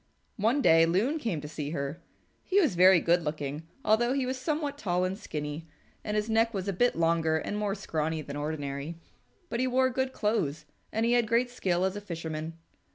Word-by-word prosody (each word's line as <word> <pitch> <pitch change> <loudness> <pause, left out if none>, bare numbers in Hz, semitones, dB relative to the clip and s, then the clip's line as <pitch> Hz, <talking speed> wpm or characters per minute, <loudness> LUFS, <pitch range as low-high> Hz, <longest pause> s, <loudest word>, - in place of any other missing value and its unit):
One 230 +7 +2
day 165 0 +6
Loon 225 - +1
came 210 - -2
to 150 - -7
see 150 -1 -5
her. 140 0 -4 0.4
He 395 +1 +2
was 315 - +3
very 180 +1 +7
good 175 +2 +3
looking 150 0 -4 0.2
although 240 +4 +3
he 270 -2 0
was 260 +1 -2
somewhat 295 +2 -2
tall 180 -5 0
and 185 +1 -1
skinny, 150 -5 -5 0.4
and 210 0 -2
his 210 +1 0
neck 225 0 +2
was 190 0 -3
a 200 - 0
bit 245 +7 +2
longer 165 -1 +2
and 180 - -3
more 210 -1 -1
scrawny 160 -5 -2
than 140 0 -7
ordinary, 145 +1 -4 0.5
but 235 - -3
he 255 - +2
wore 260 +1 +2
good 260 +1 -1
clothes 160 - -1 0.3
and 225 +1 0
he 235 - +3
had 240 -2 +3
great 235 +2 +2
skill 185 -6 0
as 190 +1 -1
a 205 - -5
fisherman. 165 -3 -5
185 Hz, 205 wpm, -29 LUFS, 160-235 Hz, 0.5 s, very